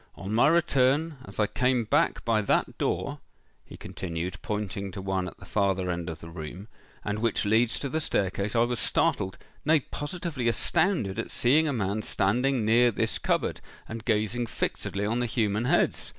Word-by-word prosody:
On 95 +2 -5
my 115 +5 +5
return, 155 -2 +2
as - - -9
I 105 - +4
came 125 +2 +1
back 145 +9 +1
by 115 -2 +2
that 100 - 0
door," - - -1 0.4
he - - -12
continued, 90 +1 -5
pointing 100 -2 -3
to - - -6
one 95 -1 -1
at - - -9
the - - -13
farther 95 -3 0
end 85 0 -3
of 80 -1 -7
the 80 - -9
room, 85 +5 -7 0.4
"and 105 0 -1
which 115 -1 0
leads 110 +3 +3
to 140 - -3
the 155 +4 -1
staircase, 100 - -1
I 115 - +4
was 120 0 -1
startled—nay, 145 +10 0
positively 145 -4 -3
astounded 160 - +1
at - - -3
seeing 150 +6 +3
a - - +1
man 105 -4 -1
standing 120 +5 +1
near 120 +3 +5
this 110 - -1
cupboard, - - 0 0.3
and 110 0 -6
gazing 115 +1 0
fixedly 100 -2 -2
on 115 +3 0
the 120 - 0
human 110 -1 0
heads. - - +1
110 Hz, 180 wpm, -27 LUFS, 100-125 Hz, 0.4 s, my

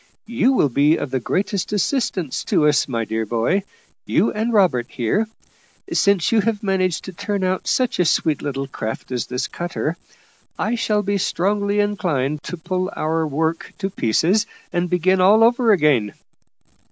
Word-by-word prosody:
You 240 +3 +2
will 150 - +3
be 145 +5 +3
of 135 - -4
the 130 - 0
greatest 195 - -2
assistance 200 - -1
to 150 - +2
us, 145 -1 +2
my 115 -4 -2
dear 110 +1 -2
boy 115 - 0 0.5
you - - +2
and 220 +3 -1
Robert 180 - +3
here. 160 - 0 0.7
Since 200 -5 +2
you 225 -2 +4
have 220 -1 -1
managed 185 -3 0
to 190 - -8
turn 200 +1 -3
out 185 0 -1
such 255 -6 +1
a 180 - +3
sweet 155 -2 +1
little 135 -1 -3
craft 115 -3 -6
as 125 -1 -2
this 125 0 -2
cutter, 170 -1 -4 0.6
I 215 - -1
shall 215 -3 0
be 200 0 0
strongly 200 +3 0
inclined 150 -9 0
to 180 - -5
pull 185 +3 -2
our 160 +1 -1
work 160 +3 -2
to 195 -1 -3
pieces 180 - +1 0.3
and 175 0 0
begin 185 +2 +2
all 210 +4 +6
over 235 0 +4
again." 145 - +3
180 Hz, 165 wpm, -21 LUFS, 145-205 Hz, 0.7 s, all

